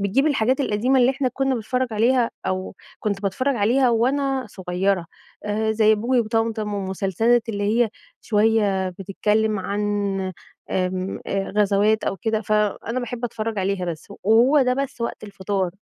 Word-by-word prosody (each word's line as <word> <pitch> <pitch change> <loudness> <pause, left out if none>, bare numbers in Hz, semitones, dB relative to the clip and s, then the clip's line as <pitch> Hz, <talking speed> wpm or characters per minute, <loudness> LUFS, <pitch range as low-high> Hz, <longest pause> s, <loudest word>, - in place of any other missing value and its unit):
بتجيب 210 +9 +2
الحاجات 260 -1 +2
القديمة 255 +2 +2
اللي 250 +1 +5
إحنا 270 -1 -1
كنا 270 +1 0
بنتفرج 250 +3 -1
عليها، 235 +2 +2 0.2
أو 185 0 -3 0.3
كنت 205 -1 -2
باتفرج 255 +7 0
عليها 245 +5 +3
وأنا 265 +2 +1
صغيرة، 185 -1 -1 0.4
آآ، 220 +1 0
زي 220 0 +4
بوجي 240 +4 +1
وطمطم، 225 -2 -1
والمسلسلات 200 +5 0
اللي 205 -2 -2 0.2
هي - - -3 0.3
شوية 210 -3 +2
بتتكلم 210 +3 0
عن، 200 +2 -3 0.9
آمم، 185 0 -2
آآ 195 0 -2
غزوات 210 +1 +3
أو 195 - -1
كده، 220 0 -1
فأنا 215 +3 0
باحب 245 0 -5
أتفرج 225 -2 -3
عليها 190 -1 -1
بس، 165 -3 -6
و - - -9
وهو 245 +7 +5
ده 250 0 +2
بس 275 -2 -4
وقت 235 -2 -4
الفطار. 195 -2 -2
220 Hz, 150 wpm, -22 LUFS, 200-245 Hz, 0.9 s, اللي